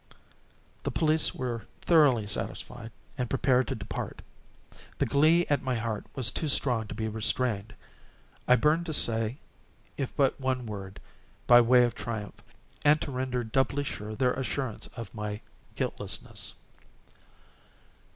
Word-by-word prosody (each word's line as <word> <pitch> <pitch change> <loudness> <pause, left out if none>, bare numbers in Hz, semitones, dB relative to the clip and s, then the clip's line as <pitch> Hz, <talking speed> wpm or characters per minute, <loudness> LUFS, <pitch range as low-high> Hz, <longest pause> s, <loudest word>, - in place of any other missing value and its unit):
The - - -2
police 155 0 +2
were 120 -3 -4
thoroughly 145 -10 +4
satisfied 110 +2 -4 0.3
and 125 -2 -1
prepared 130 -2 +2
to - - -2
depart. - - -6 0.7
The - - +2
glee 160 +5 +4
at 145 - +1
my 130 -1 -1
heart 115 -2 -3
was 120 -5 +1
too 155 - -1
strong 125 -5 +2
to - - -7
be 110 - -2
restrained. 110 -1 -1 0.7
I 125 - +7
burned 155 +7 +2
to 160 - -2
say 115 -2 +2 0.6
if 135 -3 -3
but 140 0 +2
one 130 -2 -1
word, 100 -3 -7 0.5
by 120 0 +8
way 125 +1 +6
of 120 -1 +1
triumph, 110 -4 -6 0.4
and 150 +1 +5
to 145 - -4
render 125 -1 -2
doubly 135 +5 +1
sure 110 -5 -5
their 125 +1 +2
assurance 130 -3 -3
of 115 -5 -7
my 105 -1 -4 0.3
guiltlessness. - - -3
125 Hz, 140 wpm, -29 LUFS, 110-135 Hz, 0.7 s, by